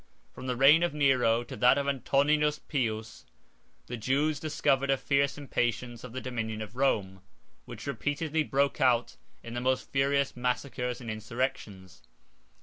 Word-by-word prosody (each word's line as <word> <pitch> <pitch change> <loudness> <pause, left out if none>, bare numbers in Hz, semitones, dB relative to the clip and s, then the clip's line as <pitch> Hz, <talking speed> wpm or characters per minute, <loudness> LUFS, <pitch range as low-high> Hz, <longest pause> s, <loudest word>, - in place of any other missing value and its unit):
From 130 - -8
the 125 - -1
reign 140 +6 +6
of 175 -3 0
Nero 125 -5 +3
to - - -9
that 125 +2 +5
of 140 0 -1
Antoninus 145 +2 +2
Pius, 110 -8 -3 0.6
the 125 - -6
Jews 140 +6 0
discovered 140 -3 0
a 135 - +3
fierce 140 +2 +1
impatience 120 -4 -2
of 125 - -8
the 130 - -4
dominion 110 -3 -4
of 110 +2 -11
Rome, 100 -8 0 0.4
which - - -9
repeatedly 155 +2 -1
broke 140 0 0
out 120 -2 +2 0.3
in 115 - -8
the 120 - -3
most 130 0 -1
furious 140 0 +1
massacres 125 0 -2
and 115 -2 -5
insurrections. 110 -4 -4
130 Hz, 150 wpm, -29 LUFS, 120-140 Hz, 0.6 s, reign